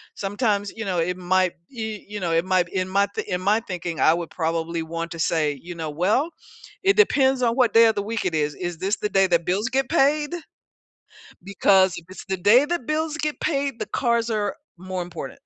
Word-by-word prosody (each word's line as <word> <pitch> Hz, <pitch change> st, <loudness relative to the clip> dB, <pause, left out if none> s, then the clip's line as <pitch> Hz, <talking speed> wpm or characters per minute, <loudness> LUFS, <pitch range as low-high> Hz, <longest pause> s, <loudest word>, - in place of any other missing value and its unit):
Sometimes, 205 Hz, 0 st, -1 dB
you 225 Hz, -, -4 dB
know, 185 Hz, -3 st, -1 dB
it 180 Hz, +2 st, -1 dB
might 185 Hz, 0 st, +2 dB, 0.2 s
y 220 Hz, -4 st, -6 dB
you 205 Hz, 0 st, -6 dB
know, 170 Hz, -2 st, -1 dB
it 165 Hz, +1 st, +2 dB
might 185 Hz, -2 st, +1 dB
in 185 Hz, 0 st, -2 dB
my 200 Hz, +2 st, +2 dB
th -, -, -4 dB
in 180 Hz, 0 st, -2 dB
my 205 Hz, +4 st, +3 dB
thinking, 175 Hz, -3 st, -4 dB
I 160 Hz, -, +5 dB
would 170 Hz, -1 st, -3 dB
probably 165 Hz, 0 st, -2 dB
want 165 Hz, +1 st, -5 dB
to 165 Hz, -, -7 dB
say, 155 Hz, -3 st, 0 dB
you 175 Hz, 0 st, -8 dB
know, 160 Hz, -2 st, -4 dB
"Well, 205 Hz, -, +1 dB, 0.5 s
it 395 Hz, +1 st, +4 dB
depends 270 Hz, -11 st, +3 dB
on 235 Hz, -1 st, +2 dB
what 245 Hz, -5 st, +3 dB
day 230 Hz, 0 st, +7 dB
of 220 Hz, -, +1 dB
the 205 Hz, -, -1 dB
week 225 Hz, +2 st, -3 dB
it 180 Hz, -, -1 dB
is, 150 Hz, -1 st, 0 dB
is 175 Hz, -2 st, -5 dB
this 195 Hz, +5 st, 0 dB
the 210 Hz, -, -3 dB
day 195 Hz, -1 st, +3 dB
that 170 Hz, -2 st, +1 dB
bills 195 Hz, +6 st, 0 dB
get 265 Hz, 0 st, 0 dB
paid? 295 Hz, 0 st, +2 dB, 1.1 s
Because 190 Hz, -1 st, +3 dB
if 165 Hz, -, -10 dB
it's 185 Hz, -, -10 dB
the 190 Hz, -1 st, -1 dB
day 210 Hz, +9 st, +5 dB
that 310 Hz, -5 st, -3 dB
bills 310 Hz, 0 st, -1 dB
get 305 Hz, -1 st, -2 dB
paid, 275 Hz, -5 st, -1 dB
the -, -, -2 dB
cars 235 Hz, -2 st, 0 dB
are 210 Hz, -2 st, -1 dB, 0.2 s
more 185 Hz, 0 st, -4 dB
important," 170 Hz, -6 st, -8 dB
195 Hz, 220 wpm, -23 LUFS, 175-235 Hz, 1.1 s, day